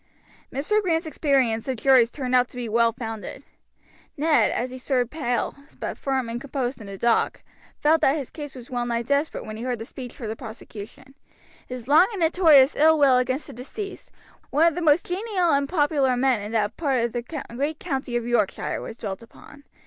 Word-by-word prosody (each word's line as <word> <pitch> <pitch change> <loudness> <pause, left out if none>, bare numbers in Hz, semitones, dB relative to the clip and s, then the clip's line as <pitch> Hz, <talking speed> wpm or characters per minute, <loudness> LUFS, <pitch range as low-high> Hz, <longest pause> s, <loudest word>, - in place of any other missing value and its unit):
Mr. 360 +11 +1
Grant's 330 -4 0
experience 270 -8 +1
of 260 - -1
juries 255 -1 +5
turned 255 -1 -4
out 250 -1 +4
to - - -17
be 245 -1 -3
well 230 +1 +3
founded. 225 -2 -7 0.7
Ned, 310 +2 +3
as 250 +1 -2
he 255 - -8
stood 250 -2 0
pale, 245 -6 -1 0.3
but - - -4
firm 265 -3 -1
and 235 +1 -4
composed 265 -3 -3
in 210 - -9
the 195 0 -7
dock, 235 +3 +1 0.3
felt 315 +2 +3
that 275 +3 +3
his 275 -4 -6
case 290 -3 -8
was 250 -1 -11
well 245 -1 -1
nigh 235 0 -1
desperate 285 +5 -1
when 215 0 -7
he 230 - -6
heard 250 -1 -1
the 225 - -7
speech 250 0 -9
for 235 - -7
the 220 - -3
prosecution: 220 +2 -10 0.5
his 250 -2 -7
long 310 +6 +6
and 390 - -4
notorious 320 -5 +5
ill 315 +2 +5
will 275 -4 +5
against 255 +3 -1
the - - -10
deceased, 385 - -7 0.4
"one 310 +3 +3
of - - -8
the 350 - -4
most 315 0 +4
genial 370 -2 0
and 280 0 +1
popular 295 -4 +2
gentlemen 250 -2 +2
in 205 +1 -6
that 215 -2 0
part 270 -7 +1
of 235 - -2
the 240 -1 -2 0.3
great 290 +4 -1
county 265 -7 -3
of 240 -1 -1
Yorkshire," 235 -5 0
was 225 - -8
dwelt 195 -3 -5
upon. 285 +5 -16
260 Hz, 205 wpm, -24 LUFS, 235-295 Hz, 0.7 s, long